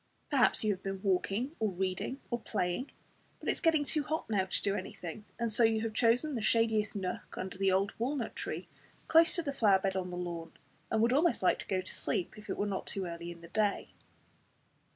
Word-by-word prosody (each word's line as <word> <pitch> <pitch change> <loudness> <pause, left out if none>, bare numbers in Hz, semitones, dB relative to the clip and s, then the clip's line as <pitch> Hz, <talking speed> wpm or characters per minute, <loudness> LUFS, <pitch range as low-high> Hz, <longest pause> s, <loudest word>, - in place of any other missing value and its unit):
Perhaps 265 -5 +4
you 215 -1 +3
have 190 - -9
been 195 -1 -4
walking, 200 - 0
or 220 -1 +2
reading, 190 +7 -2
or 240 - 0
playing, 210 +2 -2 0.5
but - - -9
it - - +4
is - - -3
getting 320 -3 +4
too 305 +1 +1
hot 310 +2 -2
now 195 -3 +2
to 185 - -1
do 200 - +2
anything; 200 +1 -6
and 235 -1 -1
so 230 +2 +3
you 225 -1 +4
have 225 -1 -2
chosen 245 +7 +3
the 235 - -2
shadiest 220 -1 +2
nook 185 -2 -4
under 185 0 -4
the 195 0 +2
old 195 +2 +2
walnut 245 0 -1
tree, - - -4 0.4
close 330 +1 +6
to 340 - +1
the 280 -2 -2
flower 205 -7 +5
bed 190 0 -1
on 185 -1 -2
the 180 - -5
lawn, 170 -2 -5 0.4
and 220 0 +2
would 235 +2 +4
almost 310 - +3
like - - +4
to - - -6
go 185 -1 0
to 185 - -7
sleep 175 - -2
if 210 0 -12
it - - -2
were 205 - 0
not 195 -2 -3
too 195 -2 -3
early 170 0 -6
in 170 -1 -9
the 170 - -12
day. 210 0 0
210 Hz, 230 wpm, -32 LUFS, 185-240 Hz, 0.5 s, close